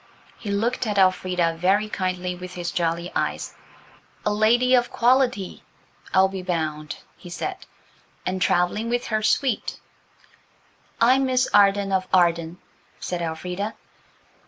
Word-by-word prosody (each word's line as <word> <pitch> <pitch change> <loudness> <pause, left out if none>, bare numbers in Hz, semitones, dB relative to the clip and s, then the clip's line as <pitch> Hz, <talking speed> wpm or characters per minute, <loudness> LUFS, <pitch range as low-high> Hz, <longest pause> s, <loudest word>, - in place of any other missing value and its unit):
He 215 - -6
looked 230 +4 0
at 210 -1 -1
Elfrida 185 -3 +2
very 195 +4 +2
kindly 185 -3 -2
with 180 +1 -9
his 175 -1 -3
jolly 170 0 -1
eyes. - - -2 0.7
"A 210 - +2
lady 240 +4 +3
of 245 -1 +4
quality, 245 -5 +1 0.5
I'll 190 0 +5
be 190 -1 -6
bound," 155 -4 -3 0.2
he 175 - -12
said, 370 - -4 0.7
"and 185 0 -2
travelling 180 +7 +1
with 245 +1 -1
her 215 -1 0
suite." 245 +2 0 1.2
"I'm 260 +3 +4
Miss 255 0 +2
Arden 200 -1 +4
of 190 -1 0
Arden," 170 -2 +2 0.4
said 180 -1 -4
Elfrida. 180 +6 -4
190 Hz, 130 wpm, -24 LUFS, 180-220 Hz, 1.2 s, I'll